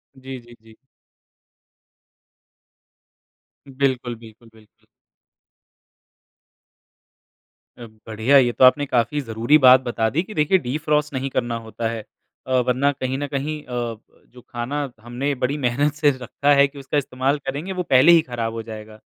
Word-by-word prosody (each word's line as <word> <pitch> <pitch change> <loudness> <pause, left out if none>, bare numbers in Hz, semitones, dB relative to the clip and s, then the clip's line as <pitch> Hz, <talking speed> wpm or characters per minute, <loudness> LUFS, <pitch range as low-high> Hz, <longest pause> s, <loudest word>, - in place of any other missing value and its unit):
जी, 130 0 -9
जी, 120 0 -17
जी। 110 0 -19 2.9
बिल्कुल, 130 -3 -1
बिल्कुल, 115 0 -16
बिल्कुल। 110 -1 -24 2.9
अ, 120 - -9 0.2
बढ़िया 110 +5 +3
ये 125 -3 +4
तो 125 - 0
आपने 145 +3 +4
काफ़ी 125 +2 0
जरूरी 115 +4 +2
बात 130 0 +8
बता 120 -3 -1
दी 155 +8 0
कि 215 - -11
देखिए 155 +4 +3
डिफ्रॉस्ट 150 +1 -1
नहीं 135 +1 -3
करना 120 -2 -2
होता 115 +1 -4
है। 115 -1 -5 0.4
अ, - - -6 0.2
वरना 130 +3 +2
कहीं 130 -1 -4
न 145 +1 -3
कहीं 145 +2 -3
अ, 120 -2 -4 0.3
जो 125 - -16
खाना 120 +5 -4 0.2
हमने 125 +5 -3
बड़ी 140 +4 0
मेहनत 140 +5 +1
से 150 -1 +2
रखा 135 +2 0
है 140 0 +5
कि 140 0 -13
उसका 140 +2 -3
इस्तेमाल 135 +1 -1
करेंगे 145 +8 -4
वो 180 -1 -3
पहले 130 +6 +7
ही 170 -1 +6
खराब 115 -2 -3
हो 115 0 -5
जाएगा। 110 -1 -10
130 Hz, 150 wpm, -22 LUFS, 120-145 Hz, 2.9 s, बात